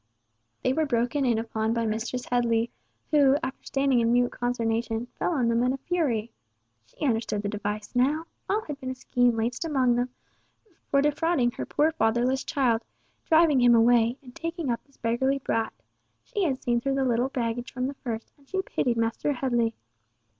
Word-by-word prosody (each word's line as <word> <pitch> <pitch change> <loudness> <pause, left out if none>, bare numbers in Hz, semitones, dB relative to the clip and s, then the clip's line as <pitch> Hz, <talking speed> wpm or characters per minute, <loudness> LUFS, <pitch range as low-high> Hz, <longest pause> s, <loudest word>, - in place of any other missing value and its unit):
They 255 - +2
were 315 +1 +1
broken 245 +3 +1
in 235 -3 +2
upon 225 0 -1
by 230 -1 0
Mistress 225 +3 -2
Headley, 235 -1 +1 0.4
who, 285 -2 +5
after 260 +1 -5
standing 275 -2 +2
in 230 0 +2
mute 245 0 +3
consternation, 230 -1 -1
fell - - +1
on 255 -6 +1
them 230 0 +2
in 250 +1 +2
a - - -3
fury. 260 -10 -1 0.6
She 205 - -5
understood 225 -4 0
the 205 - -1
device 210 +2 -4
now! 290 +6 +2 0.2
All 420 +3 +2
had 290 -2 -6
been 260 - -5
a 260 - -3
scheme 245 -3 +1
laid 230 +2 0
amongst 260 -7 +2
them 245 +1 0 0.8
for 275 0 +3
defrauding 295 -4 +2
her - - -6
poor 305 +2 +2
fatherless 245 0 +1
child, 255 -8 +1 0.5
driving 315 -5 +5
him 240 -1 +6
away, 235 +1 +4
and 250 -2 -14
taking 330 -5 -3
up 235 - -3
this 280 - -28
beggarly 250 +4 +1
brat. 225 -4 -1 0.5
She 405 -3 -1
had 265 -5 -1
seen 240 -1 +1
through 275 +2 0
the 270 -1 +1
little 245 +1 +1
baggage 240 -1 -3
from 255 0 -2
the 275 - -2
first, 230 -4 -6
and 275 - -25
she 380 0 -1
pitied 240 -9 -1
Master 230 +5 0
Headley. 240 -3 0
245 Hz, 185 wpm, -27 LUFS, 230-275 Hz, 0.8 s, him